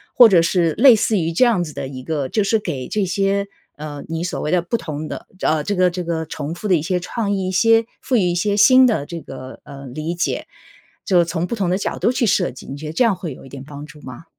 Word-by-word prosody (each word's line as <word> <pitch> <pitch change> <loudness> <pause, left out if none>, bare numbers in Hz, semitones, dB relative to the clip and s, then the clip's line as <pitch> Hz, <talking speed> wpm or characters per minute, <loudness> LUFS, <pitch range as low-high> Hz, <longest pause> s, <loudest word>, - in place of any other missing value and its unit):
或 245 - +9
者 180 -4 +5
是 170 -1 +1
类 265 -4 +8
似 215 0 +1
于 165 0 -1
这 170 - +3
样 230 -8 +3
子 155 - -9
的 - - -5
一 130 -2 -8
个 145 -1 -3
就 215 - +1
是 225 - +2
给 145 -11 -5
这 210 - -1
些， 195 +2 0 0.3
呃， 150 -1 -7
你 165 +1 -3
所 180 - -3
谓 - - -2
的 180 -1 +3
不 175 +7 -2
同 155 -5 -6
的 - - -7
呃， 155 -1 +1
这 205 - -1
个 180 -1 +3
这 180 +1 -4
个 165 -1 -3
重 155 +1 -5
复 210 - -5
的 185 - +5
一 160 - 0
些 180 +4 -1
创 205 +4 -3
意， 190 -2 -1
一 - - -2
些 225 +4 +4 0.2
赋 260 - -1
予 225 - +4
一 180 -1 +1
些 200 +4 0
新 255 +5 +7
的 215 - 0
这 170 +2 -7
个， 130 -3 -10
呃， 140 0 -10
理 155 +7 -4
解。 175 - -2 0.6
就 180 -3 +4
从 165 +1 -2
不 235 - -3
同 190 -5 -1
的 - - +2
角 - - -3
度 235 - +1
去 250 -2 0
设 190 -2 +1
计， 125 - -13
你 140 - -6
觉 155 - -9
得 155 - -5
这 205 - +2
样 225 -4 +3
会 170 -6 -6
有 - - -14
一 135 - -13
点 135 0 -9
帮 145 0 -9
助 150 0 -14
吗？ 130 +4 -10
175 Hz, 300 characters per minute, -20 LUFS, 155-200 Hz, 0.6 s, 或